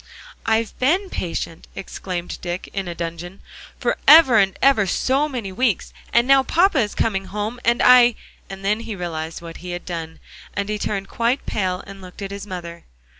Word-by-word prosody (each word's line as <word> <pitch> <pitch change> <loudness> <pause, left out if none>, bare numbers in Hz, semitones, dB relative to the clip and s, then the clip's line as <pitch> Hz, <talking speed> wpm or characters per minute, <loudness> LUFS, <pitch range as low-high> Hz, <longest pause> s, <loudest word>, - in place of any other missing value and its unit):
"I've 225 0 +1
been 360 +9 +1
patient," 165 -1 -4
exclaimed 180 -2 -5
Dick, 175 +1 -5
in 195 -2 -3
a 175 - -5
dudgeon, 170 +2 -6 0.4
"forever 300 -8 +6
and 195 -1 +2
ever 245 -8 +4
so 270 +10 +1
many 235 -8 -5
weeks, 225 0 0 0.2
and 235 +1 +3
now 275 0 +6
papa 335 +3 +3
is 210 -4 -1
coming 195 -3 0
home, 210 +5 -4
and 235 +1 +2
I" 245 -2 +7 0.3
And 195 0 -8
then 210 +2 +2
he 230 -2 -6
realized 165 -2 -5
what 165 -1 -8
he 180 0 -7
had 175 - -6
done, 165 -2 -6 0.4
and 200 +1 -2
he 210 0 -2
turned 195 -2 -3
quite 235 +4 -1
pale, 185 -2 -2
and 195 0 -11
looked 185 +2 -10
at 195 - -5
his 200 +1 -7
mother. 170 -3 -7
200 Hz, 180 wpm, -21 LUFS, 180-240 Hz, 0.4 s, I